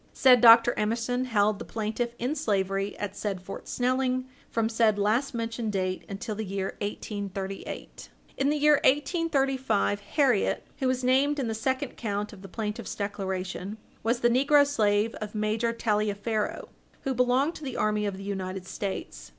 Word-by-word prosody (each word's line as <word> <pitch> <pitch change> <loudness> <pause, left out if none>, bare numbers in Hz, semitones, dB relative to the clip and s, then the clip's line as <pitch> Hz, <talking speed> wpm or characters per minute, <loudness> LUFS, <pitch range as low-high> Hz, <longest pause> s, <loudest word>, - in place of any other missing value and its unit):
Said 250 -3 +6
Dr. 230 0 +8
Emerson 230 +4 0
held 210 -4 +2
the - - -5
plaintiff 230 +2 -3
in 250 +5 -1
slavery 195 -7 -1
at 205 -1 -4
said 200 -3 -3
Fort 185 +2 -9
Snelling 255 0 0 0.2
from 225 -1 0
said 225 -2 +2
last 225 +6 +1
mentioned 230 -1 -3
date 185 -1 -2
until 200 +2 -4
the 220 +1 -4
year 195 -1 -3
1838. 200 -2 -5 0.3
In 275 +1 +1
the 300 - +1
year 300 0 +5
1835, 270 - +1
Harriet, 245 +1 +1
who 260 - +1
is 255 0 -1
named 270 +4 +3
in 265 -4 -1
the 225 - -1
second 260 +4 -2
count 210 -2 -3
of 195 - -12
the 195 - -9
plaintiff's 210 +1 -4
declaration, 190 0 -4 0.2
was 235 +2 0
the 240 - +4
negro 280 +4 +5
slave 215 -5 +1
of 215 0 -6
Major 215 +2 0
Taliaferro, 215 -1 -1 0.3
who 270 - -1
belonged 255 +5 +2
to 315 - -10
the 260 -3 -4
army 210 -1 +1
of 195 -2 -4
the 195 - -8
United 190 -2 -4
States. 185 - -5
220 Hz, 165 wpm, -27 LUFS, 205-255 Hz, 0.3 s, Dr